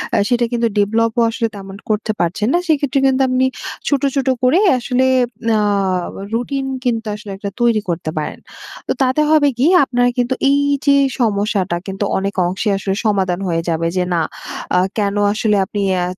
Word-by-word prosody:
আ - - +3
সেটা 240 +1 +2
কিন্তু 235 -1 +1
ডেভেলপ 225 +3 +2
ও - - +4
আসলে 230 0 -1
তেমন 195 -1 -9
করতে 215 0 0
পারছেন 180 +5 0
না। - - +4
সেক্ষেত্রে 285 -4 +1
কিন্তু 265 0 +2
আপনি 255 +1 +2 0.4
ছোট, 285 -2 +1
ছোট 270 -1 0 0.2
করে 255 +8 +4 0.2
আসলে 255 +1 0 0.5
আ - - +2 0.7
রুটিন 270 +4 -2 0.2
কিন্তু 230 -2 0
আসলে 210 -1 -9
একটা 200 0 -5
তৈরি 230 -3 +3
করতে 165 -2 -2
পারেন। 150 - -4 0.5
তো - - +1
তাতে 260 +3 +2
হবে 305 -2 +4
কি? 260 +5 +3 0.2
আপনার 245 -2 +1
কিন্তু 250 +1 +1
এই 280 - +3 0.3
যে 280 -1 +5 0.3
সমস্যাটা 200 -5 0
কিন্তু 195 +1 -3
অনেক 195 +1 -2
অংশে 190 +4 -2
আসলে 195 0 -2
সমাধান 190 -4 +1
হয়ে 165 -1 0
যাবে, 165 0 0
যে 180 - +2
না 170 - +1 0.6
আ - - +5 0.2
কেন 200 -1 0 0.2
আসলে 215 0 +1
আপনি, 205 +2 -4 0.3
আত 180 +1 -6
220 Hz, 180 wpm, -18 LUFS, 195-255 Hz, 0.7 s, যে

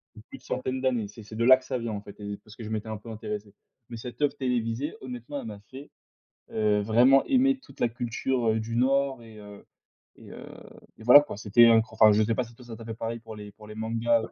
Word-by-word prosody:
de 105 - -12
plus - - -9
de - - -27
centaines 130 +1 -3
d'années. 125 -5 0
C'est 105 +2 -12
c'est 110 +1 -11
de 115 - +1
là 130 +1 +9
que 130 - -16
ça 130 - -2
vient 115 -2 -4
en 100 - -5
fait 100 0 -13
et 100 0 -6
parce 110 - -15
que 115 - -8
je - - -6
m'étais 110 0 -4
un 110 - -4
peu 110 +3 -12
intéressé, 105 -2 -6 0.4
mais 120 - -7
cette 120 +5 -9
oeuvre 145 -1 +2
télévisée, 125 +2 -2
honnêtement, 125 +2 -6
elle - - -8
m'a 105 -2 -8
fait, 135 +3 -11 0.6
heu, 105 -1 +2
vraiment 120 +6 +5
aimer 270 +1 +3
toute 265 - -18
la 120 - +3
culture, 120 +1 -2
heu, 110 0 0
du 115 +1 -4
Nord 135 0 +1
et 110 -2 -13
heu, 105 -1 -12 0.5
et - - -15
heu, - - -10 0.5
et - - -13
voilà 125 +5 +10
quoi, 145 - -8
c'était 110 +3 +5
un 115 -1 +6
enfin, 110 -1 +6
je 105 +1 +3
sais 115 +2 +1
pas 125 - -1
si 120 0 -16
toi 125 - -15
ça 115 -2 -8
t'a 115 - -11
fait 115 - -5
pareil 115 +1 -5
pour 115 -1 -10
les 105 -1 -9
pour 105 +1 -15
les 105 - -9
mangas, 115 +1 +1
heu, - - -6
115 Hz, 270 wpm, -27 LUFS, 110-125 Hz, 0.6 s, voilà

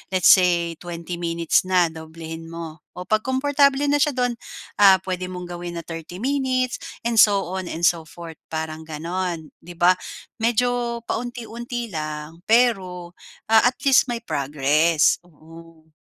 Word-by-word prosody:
let's 185 - +6
say, 170 -3 +3
20 170 0 -6
minutes 170 +1 +1
na, 180 -3 +3
doblehin 160 0 -9
mo. 165 -1 -8 0.2
Oh, 180 - -6
'pag 215 +4 +1
komportable 280 +3 +2
na 290 - +3
siya 290 -1 +2
do'n, 245 -1 +1 0.5
ah, 190 -2 +7
pwede 185 -1 -3
mong 180 -1 -7
gawin 175 0 -6
na 170 - -5
30 165 +4 -8
minutes 260 -2 0 0.2
and 230 -1 +1
so 200 -5 +4
on 190 -1 -4
and 165 0 -6
so 165 -2 +2
forth, 165 0 -10
parang 160 0 -5
ganon, 165 +1 -4
'di 175 +1 -12
ba? 175 +1 +5 0.5
Medyo 235 +1 0
paunti-unti 240 0 -5
lang, 155 0 -5
pero, 190 -7 +2 0.4
ah, 225 +2 +6
at 250 - 0
least 270 -2 +5
may 240 -1 -4
progress, 150 - +2
oo. 165 0 -17
180 Hz, 150 wpm, -22 LUFS, 165-235 Hz, 0.5 s, ah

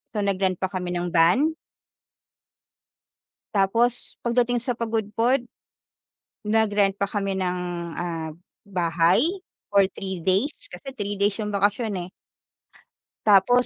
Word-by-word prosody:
so 210 - 0
nag-rent 190 -2 +1
pa 190 0 -2
kami 180 -1 -3
ng 175 0 -2
van. 240 - +4 2.0
Tapos 230 +5 +1
pagdating 240 0 +2
sa 240 0 -2
Pagudpud, 230 +2 0 1.0
nag-rent 210 -2 +3
pa 200 - -1
kami 200 -2 -1
ng, 180 -1 -1 0.4
ah, 165 -2 -3 0.4
bahay 175 -1 +2 0.5
for 200 -1 +5
3 190 -3 -4
days, 195 - +1 0.2
kasi 220 +10 -9
3 205 -4 -4
days 200 0 +1
yung 210 - -2
bakasyon, 205 +2 +1 0.2
eh. - - -32 1.2
Tapos, 215 +5 +5
200 Hz, 115 wpm, -24 LUFS, 185-230 Hz, 2.0 s, for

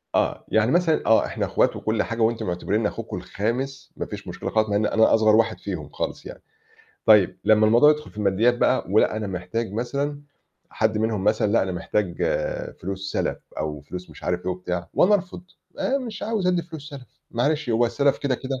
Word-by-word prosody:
آه. - - 0
يعني 110 +3 +2
مثلًا 170 -2 +2
آه، 110 - +4
إحنا - - -2
أخوات - - +1
وكل 110 0 0
حاجة 115 0 -4
وأنتم 115 +1 +1
معتبرينّي 100 +5 0
أخوكم - - -6
الخامس، 130 +6 -4
ما - - -3
فيش 100 -2 -8
مشكلة 90 +1 -5
خالص، 110 -1 +1
مع 100 - 0
إن 105 +1 +2
أنا 110 +1 +4
أصغر 110 -1 +5
واحد 115 -1 +2
فيهم - - -5
خالص - - -4
يعني، - - -9 0.7
طيب 105 -4 +5
لمّا 110 0 +5
الموضوع 120 +7 +6
يدخُل 150 0 -2
في - - -22
المادّيات 105 +4 +2
بقى 130 - +2
ولأ 105 +1 +3
أنا 110 -1 -3
محتاج 95 +4 -4
مثلًا 140 +6 -2 0.5
حد 110 -1 0
منهم 110 -3 -1
مثلًا 105 -1 +2
لأ، 115 - +4
أنا 95 - -2
محتاج 90 +1 -2 0.6
فلوس 95 +1 -5
سَلَف - - -1 0.2
أو 75 -1 -3
فلوس 90 +5 -9
مش - - -14
عارف 90 0 0
إيه 95 - -1
وبتاع 90 -1 -4
وأنا 205 +4 +5
أرفض، 185 -2 -3 0.4
آآ 275 +1 +1
مش 230 -6 -7
عاوز 215 -4 -1
أدّي 180 -2 +2
فلوس 160 -3 -9
سَلَف، 135 -3 -9 0.2
معلش 145 +2 0
هو 115 +2 +3
السَلَف 140 +4 +1
كده 140 -3 0
كده 130 +1 -4
110 Hz, 200 wpm, -24 LUFS, 100-140 Hz, 0.7 s, الموضوع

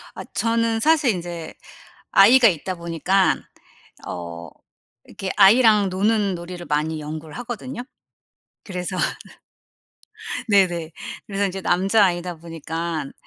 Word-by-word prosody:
아 - - -6
저는 230 0 +1
사실 300 -2 +3
인제 170 -3 -6 0.6
아이가 230 +4 +7
있다 185 +1 -2
보니깐 170 +3 +1 0.6
어 85 -1 -7 0.6
이렇게 190 -1 -6
아이랑 210 0 +6
노는 200 +1 +1
놀이를 175 0 -8
많이 155 +1 -1
연구를 155 +1 -7
하거든요. 245 +1 -6 0.8
그래서 185 -1 -5 1.5
네네. 175 -5 +2 0.3
그래서 200 0 -1
이제 190 0 -5
남자아이다 180 -2 +2
보니깐 165 -1 -5
185 Hz, 245 characters per minute, -22 LUFS, 165-210 Hz, 1.5 s, 아이가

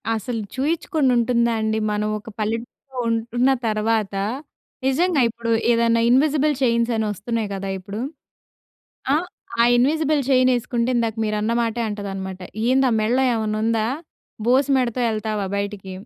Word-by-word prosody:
అసలు 225 +1 -3
చూయిచ్చుకొని 305 +1 0
ఉంటుందా 235 0 +2
అండి? 220 0 0
మనం 210 0 -1
ఒక 210 - -11
పల్లెటూరులో 230 +5 -4
ఉంటున్న 235 +3 +1 0.2
తర్వాత, 215 -1 0 0.7
నిజంగా 310 +3 +2
ఇప్పుడు 230 0 -4 0.2
ఏదైనా 230 0 +3
ఇన్విజిబుల్ 295 +3 +3
చైన్స్ 235 -2 +2
అని 220 -1 0
వస్తున్నాయి 220 +1 -3
కదా! 195 0 -4
ఇప్పుడు. 200 +3 -7 1.1
ఆ! - - +5 0.5
ఆ - - +7
ఇన్విజిబుల్ 300 +4 +2
చైన్ 255 -1 +4
యేసుకుంటే 240 0 0
ఇందాక 230 -2 0
మీరన్నమాటే 225 +2 0
అంటదనమాట. 195 -2 -5 0.3
"ఏంద 265 +1 +4
ఆ - - +1
మెడలో 235 +5 +2
ఏమన్నా 215 -1 -1
ఉందా? 225 -1 +1 0.6
బోసు 260 +3 +3
మెడతో 250 -1 0
యెళ్తావా 215 -2 -2
బయటికి" 200 -1 -4
230 Hz, 130 wpm, -22 LUFS, 215-255 Hz, 1.1 s, ఆ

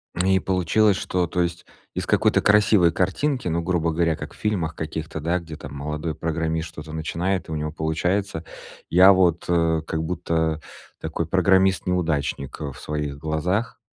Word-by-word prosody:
И 95 +2 +3
получилось, 95 +3 +2
что, 90 -1 -1
то 90 - -1
есть 85 0 -2 0.3
из - - -3
какой-то - - +3
красивой 100 -4 +5
картинки, 125 - 0
ну, 85 0 0
грубо 85 -1 0
говоря, 80 0 +1
как - - -8
в - - -17
фильмах 90 -7 -1
каких-то, 80 0 -5
да, 85 +4 0
где 80 -2 -9
там 70 -1 -9
молодой 75 +2 -3
программист 80 0 -2
что-то 80 -1 -9
начинает, 85 +4 -2
у 80 - -3
него 75 0 -3
получается, 80 +3 -1 0.5
я 95 +3 +8
вот, 90 -3 +2
а, 85 -2 +2
как 80 0 -3
будто, 80 -2 -1 0.4
такой 80 0 -3
программист-неудачник, 90 -6 +1
э, 70 -2 -3
в 65 - -12
своих 75 -2 -4
глазах. 80 +9 -1
85 Hz, 160 wpm, -23 LUFS, 80-90 Hz, 0.5 s, я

